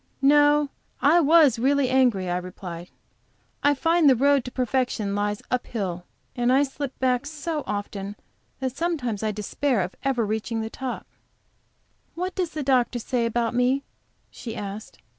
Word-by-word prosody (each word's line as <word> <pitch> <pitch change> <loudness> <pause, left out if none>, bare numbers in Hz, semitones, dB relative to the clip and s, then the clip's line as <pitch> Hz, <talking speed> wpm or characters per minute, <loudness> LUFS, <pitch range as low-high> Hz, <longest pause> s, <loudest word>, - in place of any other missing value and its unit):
"No, 290 +1 +5 0.3
I 315 +5 +5
was 300 -6 +5
really 275 +2 +2
angry," 245 -8 +3
I 175 0 0
replied. 180 -1 -7 0.7
"I 290 0 +3
find 330 +1 +4
the 265 - +6
road 280 +1 +3
to 250 - -6
perfection 250 -5 -1
lies 205 0 -1
up 250 0 -1
hill, 180 -6 -4 0.3
and 245 0 +1
I 270 +2 +5
slip 275 -1 -5
back 255 +1 +1
so 305 0 -4
often 205 0 -4 0.4
that 260 -1 -3
sometimes 285 - -2
I 215 -1 0
despair 215 +3 -1
of 180 +1 -4
ever 255 -4 +1
reaching 220 +2 -2
the 220 0 -5
top." 260 -2 -5 1.1
"What 365 +2 -3
does 360 -2 -1
the 305 -2 -4
doctor 255 -2 +2
say 240 0 -1
about 230 0 -1
me?" 250 +3 +2 0.5
she 230 -2 -7
asked. 205 0 -7
250 Hz, 160 wpm, -25 LUFS, 215-285 Hz, 1.1 s, the